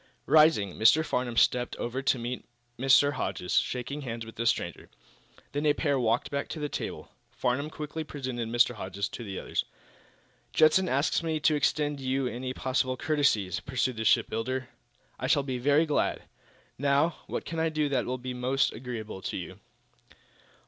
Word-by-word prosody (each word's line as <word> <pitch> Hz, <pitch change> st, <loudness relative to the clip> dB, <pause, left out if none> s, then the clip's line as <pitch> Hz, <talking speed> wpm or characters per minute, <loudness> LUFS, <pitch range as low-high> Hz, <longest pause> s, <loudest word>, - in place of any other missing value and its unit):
Rising, 155 Hz, -, +5 dB
Mr. 120 Hz, +9 st, +5 dB
Farnum 125 Hz, -5 st, -2 dB
stepped 125 Hz, +1 st, +3 dB
over 125 Hz, +3 st, -3 dB
to 135 Hz, -1 st, +2 dB
meet 120 Hz, +1 st, -4 dB, 0.4 s
Mr. 135 Hz, +2 st, +5 dB
Hodges, 90 Hz, -8 st, 0 dB
shaking 130 Hz, +4 st, -4 dB
hands 115 Hz, -4 st, -5 dB
with 115 Hz, -, -11 dB
the 115 Hz, +1 st, -1 dB
stranger. -, -, -1 dB, 0.6 s
Then 145 Hz, -, -2 dB
the 150 Hz, -1 st, +3 dB
pair 145 Hz, -3 st, 0 dB
walked 115 Hz, 0 st, +1 dB
back 140 Hz, 0 st, -2 dB
to 160 Hz, -, -6 dB
the 150 Hz, -, -1 dB
table. -, -, -5 dB, 0.2 s
Farnum 135 Hz, +5 st, -1 dB
quickly 155 Hz, +1 st, -5 dB
presented 130 Hz, -6 st, -4 dB
Mr. 120 Hz, +1 st, +3 dB
Hodges 100 Hz, -1 st, -4 dB
to 120 Hz, -, -7 dB
the 100 Hz, -4 st, -6 dB
others. -, -, -2 dB, 0.9 s
"Judson 170 Hz, +4 st, +5 dB
asks 140 Hz, +6 st, +1 dB
me 160 Hz, -2 st, -1 dB
to 155 Hz, -, +4 dB
extend 150 Hz, 0 st, +1 dB
to -, -, -8 dB
you 130 Hz, +1 st, 0 dB
any 125 Hz, +1 st, -3 dB
possible 130 Hz, 0 st, -1 dB
courtesies," 140 Hz, -11 st, +1 dB
pursued 130 Hz, 0 st, -1 dB
the 110 Hz, -, -2 dB
shipbuilder. 120 Hz, +4 st, +1 dB, 0.5 s
"I -, -, -2 dB
shall 145 Hz, -, +3 dB
be 130 Hz, -2 st, -3 dB
very 145 Hz, +5 st, +4 dB
glad. 150 Hz, -, 0 dB, 0.6 s
Now, 145 Hz, +4 st, +2 dB
what -, -, -4 dB
can 165 Hz, 0 st, -4 dB
I 165 Hz, 0 st, +2 dB
do 155 Hz, -1 st, 0 dB
that 135 Hz, -3 st, 0 dB
will 130 Hz, +1 st, -1 dB
be 125 Hz, 0 st, -5 dB
most 130 Hz, +2 st, +1 dB
agreeable 110 Hz, -5 st, -6 dB
to -, -, -4 dB
you?" 95 Hz, +1 st, -7 dB
130 Hz, 175 wpm, -28 LUFS, 120-145 Hz, 0.9 s, Rising